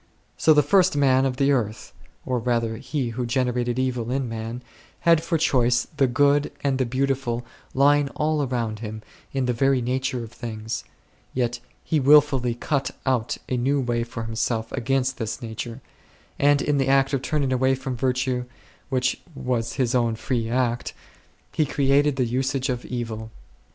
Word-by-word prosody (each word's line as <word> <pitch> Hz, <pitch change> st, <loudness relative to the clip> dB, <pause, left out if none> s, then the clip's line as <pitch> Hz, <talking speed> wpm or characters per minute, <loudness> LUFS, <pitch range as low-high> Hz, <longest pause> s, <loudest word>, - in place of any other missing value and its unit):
So 155 Hz, -, +4 dB
the 150 Hz, -, +5 dB
first 185 Hz, +1 st, +3 dB
man 135 Hz, -1 st, +4 dB
on 130 Hz, -, -1 dB
the 140 Hz, +2 st, +2 dB
earth, 110 Hz, -5 st, -2 dB, 0.3 s
or 125 Hz, -1 st, 0 dB
rather 115 Hz, -1 st, 0 dB
he 135 Hz, 0 st, -3 dB
who 120 Hz, +2 st, -3 dB
generated 125 Hz, -1 st, 0 dB
evil 125 Hz, -3 st, -1 dB
in 130 Hz, 0 st, -1 dB
man, 115 Hz, +2 st, -5 dB, 0.4 s
had 165 Hz, -1 st, +4 dB
for 165 Hz, 0 st, 0 dB
choice 120 Hz, -5 st, +2 dB
the 135 Hz, -2 st, +4 dB
Good 145 Hz, +3 st, +3 dB
and 135 Hz, -2 st, +1 dB
the 130 Hz, -, +1 dB
Beautiful 130 Hz, -2 st, -1 dB, 0.3 s
lying 145 Hz, +1 st, +4 dB
all 155 Hz, 0 st, +1 dB
around 120 Hz, -5 st, -2 dB
him 110 Hz, -1 st, -6 dB, 0.3 s
in 135 Hz, -2 st, -1 dB
the 125 Hz, -, +1 dB
very 135 Hz, +2 st, +2 dB
nature 125 Hz, 0 st, -1 dB
of 115 Hz, -, -9 dB
things; 110 Hz, -1 st, -5 dB, 0.5 s
yet 120 Hz, -1 st, 0 dB, 0.2 s
he 155 Hz, -, +1 dB
wilfully 135 Hz, -4 st, +4 dB
cut 140 Hz, +2 st, -1 dB, 0.2 s
out 125 Hz, -4 st, 0 dB
a 130 Hz, -, -1 dB
new 135 Hz, +4 st, +1 dB
way 120 Hz, -2 st, 0 dB
for 115 Hz, -1 st, -6 dB
himself 110 Hz, 0 st, -2 dB
against 130 Hz, 0 st, 0 dB
this 110 Hz, -2 st, -3 dB
nature, 115 Hz, +2 st, -6 dB, 0.6 s
and 145 Hz, 0 st, +4 dB
in 145 Hz, -1 st, +1 dB
the 135 Hz, -, +1 dB
act 135 Hz, +1 st, +3 dB
of 135 Hz, -, +1 dB
turning 140 Hz, -2 st, 0 dB
away 130 Hz, +1 st, +2 dB
from 130 Hz, -1 st, -4 dB
virtue, 125 Hz, 0 st, 0 dB, 0.4 s
which 125 Hz, -2 st, 0 dB
was 125 Hz, -3 st, -2 dB
his 125 Hz, -2 st, 0 dB
own 120 Hz, -2 st, +2 dB
free 115 Hz, 0 st, -2 dB
act, 120 Hz, -1 st, -1 dB, 0.6 s
he 155 Hz, -, +1 dB
created 140 Hz, 0 st, +2 dB
the 130 Hz, -2 st, +1 dB
usage 130 Hz, +3 st, -1 dB
of 125 Hz, -1 st, -2 dB
evil. 115 Hz, -3 st, -4 dB
130 Hz, 170 wpm, -24 LUFS, 120-135 Hz, 0.6 s, the